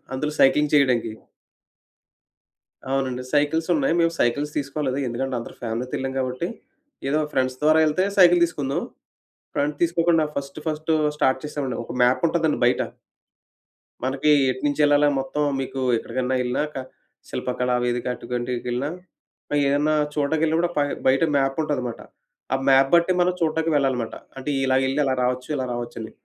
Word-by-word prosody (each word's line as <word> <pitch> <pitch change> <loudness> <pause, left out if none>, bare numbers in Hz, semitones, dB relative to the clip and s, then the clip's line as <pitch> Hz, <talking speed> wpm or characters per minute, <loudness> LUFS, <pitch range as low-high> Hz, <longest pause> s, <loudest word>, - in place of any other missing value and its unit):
అందులో 150 +3 -2
సైక్లింగ్ 150 +2 +4
చేయడానికి. 125 -6 +2 1.8
అవునండి. 130 -2 -1
సైకిల్స్ 160 +4 +1
ఉన్నాయి. 155 +1 +1
మేము 165 0 +2
సైకిల్స్ 145 +5 +1
తీసుకోలేదు. 135 -1 -2
ఎందుకంటే, 130 +2 -3
అందరం 115 - -9
ఫ్యామిలీతో 120 +2 -3
ఎళ్ళాం 135 0 -3
కాబట్టి, 130 +6 -2 0.6
ఏదో 150 +3 +1
ఫ్రెండ్స్ 130 -1 0
ద్వారా 155 +1 +5
ఎళ్తే 155 +5 +1
సైకిల్ 175 -1 +7
తీసుకుందుం. 145 -5 -2 0.7
ఫ్రెండ్స్ 145 +1 -1
తీసుకోకుండా 165 -1 +3
ఫస్ట్, 140 +1 -5
ఫస్ట్ 155 +1 -3 0.3
స్టార్ట్ 130 0 +2
చేసామండి. 140 -5 -3
ఒక 120 - -8
మ్యాప్ 125 +6 +3
ఉంటాదండి 160 -2 +1
బయట. 125 - +2 1.2
మనకి 135 +3 +1 0.2
ఎటునుంచెళ్ళాలని 145 +2 +2
మొత్తం 135 +3 -2 0.2
మీకు 135 0 -4 0.2
ఎక్కడికన్నా 125 +3 -2
ఎళ్ళినా 125 +3 0
క - - -4 0.5
శిల్పకళా 125 0 -2
వేదిక 120 0 -1
అటుకంటికెళ్ళినా 125 +2 -3 0.8
ఏదన్నా 145 +2 +2 0.2
చోటకెళ్ళిన 155 +2 +1
కూడా 175 0 +1
పై 145 - +3 0.2
బయట 135 +4 +4
మ్యాప్ 135 +1 0
ఉంటదన్నమాట. 125 -6 -3 0.5
ఆ - - +3
మ్యాప్ 135 0 +5
బట్టి 170 +2 +4
మనం 180 +1 +3
చూడ్డానికి 160 0 0
వెళ్ళాలన్నమాట. 130 -5 0 0.2
అంటే 135 +2 -4
ఇలాగెళ్లి 130 +2 +1
అలా 135 -1 +1
రావొచ్చు. 125 +1 -1
ఇలా 130 - -2
రావచ్చని. 120 -2 -6
135 Hz, 135 wpm, -23 LUFS, 125-150 Hz, 1.8 s, సైకిల్